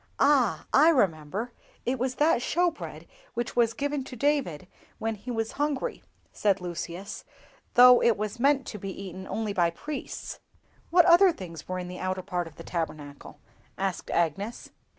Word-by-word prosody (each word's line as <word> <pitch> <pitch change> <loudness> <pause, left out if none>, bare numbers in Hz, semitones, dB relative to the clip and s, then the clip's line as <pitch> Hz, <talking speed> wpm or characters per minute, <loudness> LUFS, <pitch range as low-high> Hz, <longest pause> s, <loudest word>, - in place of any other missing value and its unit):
"Ah! 275 -6 +3
I 300 +4 +7
remember, 200 - 0 0.3
it 255 +2 -1
was 255 +1 -1
that 300 -4 +3
show 350 +6 +2
bread - - -9 0.3
which 240 0 -3
was 230 -1 +3
given 285 -1 -2
to 255 - -8
David 250 - 0 0.3
when 225 0 -2
he 215 +4 -10
was 225 -2 -2
hungry," 290 -2 -1 0.3
said 200 -2 +2
Lucius, 180 +2 -6 0.5
"though 250 0 +9
it 235 -3 +3
was 215 +3 -4
meant 275 +1 +3
to 210 - -7
be 195 - -5
eaten 190 -1 -7
only 220 -2 -2
by 175 -3 +3
priests." 290 - -6 0.5
"What 350 0 +6
other 355 +2 +7
things 170 - -9
were 185 - -3
in 180 -1 -5
the 180 0 -7
outer 185 0 -2
part 180 -3 -2
of 160 - -13
the - - -10
Tabernacle?" 155 -4 -5 0.4
asked 190 -1 -3
Agnes. 185 +7 -1
215 Hz, 170 wpm, -27 LUFS, 180-265 Hz, 0.5 s, though